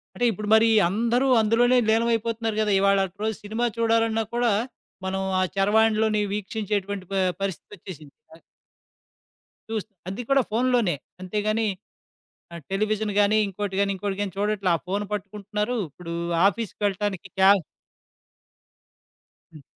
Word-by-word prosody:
అంటే 245 - -1
ఇప్పుడు 210 +1 -6
మరి 225 +1 +5 0.2
అందరూ 235 +7 +1
అందులోనే 240 +3 +3
లీనమైపోతున్నారు 225 0 +1
గదా! 210 -1 +1
ఇవాళటు 195 -1 +2
రోజు 220 -1 -1
సినిమా 220 +3 -2
చూడాలన్నా 225 -1 +2
కూడా, 240 -2 +2 0.5
మనం 190 0 -2 0.2
ఆ - - +2
చరవాణిలోని 215 +1 +3
వీక్షించేటటువంటి 205 -2 -3
ప - - -2 0.3
పరిస్థితొచ్చేసింది. 180 -5 -7 0.2
అయ్ - - -22 1.3
చూస్ 220 -2 -3 0.2
అది 195 +6 -4
కూడా 275 -1 +4
ఫోనులోనే 235 -5 +2 0.3
అంతే 185 +3 -3
గాని 220 +1 +1 0.9
ఆహ్, 170 - -8
టెలివిజన్ 215 +1 0
గాని, 205 +1 +4
ఇంకోటి 195 0 -4
గాని 200 0 +2
ఇంకోటి 195 +1 -3
గాని 200 -2 -3
చూడట్లే. 205 -2 0
ఆ - - 0
ఫోను 200 +2 -1
పట్టుకుంటున్నారు. 210 +3 -3
ఇప్పుడు 170 +3 -8 0.3
ఆఫీస్‌కెళ్ళటానికి 205 -2 -2
క్యా 190 +1 +7 2.0
హ్మ్. 155 -3 -13
210 Hz, 120 wpm, -24 LUFS, 195-225 Hz, 2.0 s, క్యా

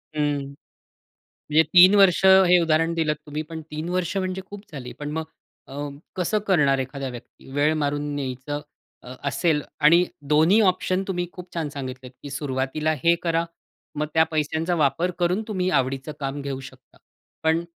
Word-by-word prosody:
हं. 145 -2 0 1.1
म्हणजे 155 - +6
3 180 +3 +9
वर्ष 195 -2 +5
हे 190 -2 +7
उदाहरण 165 0 +2
दिलत 155 -2 0
तुम्ही. 150 0 -4
पण 160 +1 -8
3 155 +2 -4
वर्ष 180 +1 -1
म्हणजे 185 0 -2
खूप 205 -1 -9
झाली. 130 -4 -7
पण 145 0 -4
मग 160 +1 -2 0.5
अं, 140 +1 -6 0.2
कसं 185 +4 0
करणार 140 -8 +3
एखादा 135 +1 -4
व्यक्ती? 120 +2 -13
वेळ 150 +2 +2
मारून 145 0 0
न्यायचं 135 +2 -4 0.7
असेल 150 +1 +1 0.2
आणि 170 +4 +6 0.3
दोन्ही 160 +8 +5
ऑप्शन 185 +1 -1
तुम्ही 175 -2 -1
खूप 180 -1 -11
छान 160 -3 -2
सांगितलेत, 130 -3 -7
की 145 - -7
सुरुवातीला 140 +2 -1
हे 170 0 +5
करा. 165 0 +1 0.5
मग 150 +1 -1
त्या 160 0 +5
पैशांचा 160 +3 0
वापर 165 +3 +1
करून 180 +4 +1
तुम्ही 185 -4 -1
आवडीचं 135 +3 -3
काम 140 0 -3
घेऊ 135 -1 -4
शकता. 130 -1 -14 0.5
पण 160 +1 +2
155 Hz, 160 wpm, -24 LUFS, 140-175 Hz, 1.1 s, 3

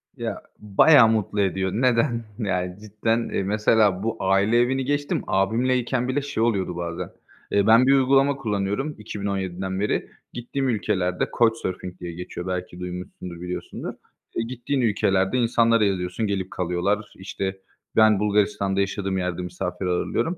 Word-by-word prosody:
Ya, - - -4 0.2
bayağı 115 +5 +6
mutlu 105 -2 0
ediyor. 95 -1 0
Neden? 115 0 +2 0.2
Yani, 90 -4 -1
cidden, 110 +2 -1
eee, - - -1
mesela 105 -1 +2
bu 115 0 -2
aile 100 +4 +3
evini 130 +2 +1
geçtim. 145 +1 -1
Abimle 115 +7 +2
iken 125 0 -1
bile 130 +3 0
şey 140 -5 -2
oluyordu 100 -6 0
bazen. 85 -1 -4 0.4
Eee, 100 0 +2
ben 115 +3 +7
bir 135 - +6
uygulama 135 +1 +4
kullanıyorum 110 +3 -2
2017'den 95 -3 -3
beri 105 - -1 0.2
gittiğim 130 +3 -2
ülkelerde 95 -5 0
Coachsurfing 95 -6 0
diye 85 -1 -6
geçiyor, 90 0 -6
belki 90 -1 -4
duymuşsundur, 90 -1 -7
biliyorsundur. 90 0 -5 0.5
Gittiğin 130 +2 -2
ülkelerde 95 -1 +2
insanlara 115 -1 +3
yazıyorsun, 95 +3 -1
gelip 95 -2 -2
kalıyorlar. 95 +4 -1
İşte, 95 0 -4 0.4
ben 110 -2 +5
Bulgaristan'da 100 -2 +1
yaşadığım 100 -1 -1
yerde 90 -1 -2
misafir 90 +1 -4
ağırlıyorum. 90 - -1
100 Hz, 140 wpm, -24 LUFS, 95-115 Hz, 0.5 s, ben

